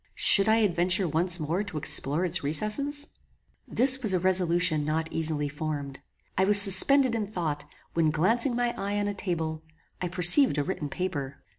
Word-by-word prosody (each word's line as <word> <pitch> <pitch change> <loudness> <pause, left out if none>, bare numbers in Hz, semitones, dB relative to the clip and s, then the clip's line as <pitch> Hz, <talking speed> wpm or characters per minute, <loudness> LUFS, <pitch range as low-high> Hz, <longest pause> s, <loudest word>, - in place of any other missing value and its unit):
Should 200 +1 +5
I 220 - +2
adventure 185 -3 -1
once 170 +3 -1
more 165 +5 -4
to 200 -6 -10
explore 150 +3 -1
its 175 -3 -3
recesses? 215 - -1 0.6
This 265 +2 +2
was 210 -6 +2
a - - -2
resolution 175 -4 0
not 160 +2 -5
easily 155 -2 -3
formed. 145 -2 -8 0.4
I 190 - -1
was 205 +1 +7
suspended 230 +7 +7
in 220 -3 -4
thought: 160 -8 -6 0.3
when 165 -2 -1
glancing 230 - -1
my 240 0 -3
eye 200 +1 -5
on 205 0 -3
a 205 - -5
table, 160 -5 -6 0.4
I 180 - -4
perceived 180 - +3
a 145 - -2
written 150 -3 -7
paper. 145 -6 -7
180 Hz, 170 wpm, -24 LUFS, 155-205 Hz, 0.6 s, was